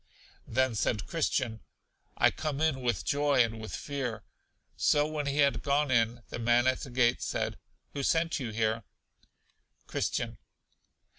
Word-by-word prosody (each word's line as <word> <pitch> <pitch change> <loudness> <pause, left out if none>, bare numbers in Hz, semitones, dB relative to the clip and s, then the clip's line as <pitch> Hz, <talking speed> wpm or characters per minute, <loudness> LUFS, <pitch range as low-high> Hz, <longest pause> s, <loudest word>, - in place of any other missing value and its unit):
Then 130 -1 +1
said 105 -1 0
Christian: 130 -8 -1 0.6
I - - +5
come 150 -3 -3
in 155 -4 +1
with 120 -5 -1
joy 145 -3 +3
and 115 -1 -4
with 110 - -5
fear. 135 -6 -4 0.5
So 145 0 +3
when 150 -1 -3
he 140 +1 -1
had 140 -1 +3
gone 140 0 +1
in, 115 0 +2
the - - -5
man 120 +1 +3
at 130 0 +2
the - - -7
gate 120 -1 +2
said: - - -2 0.3
Who 140 - -3
sent 165 +3 +1
you 125 -4 -3
here? 110 0 0 1.0
Christian. - - -2
130 Hz, 150 wpm, -30 LUFS, 115-145 Hz, 1.0 s, I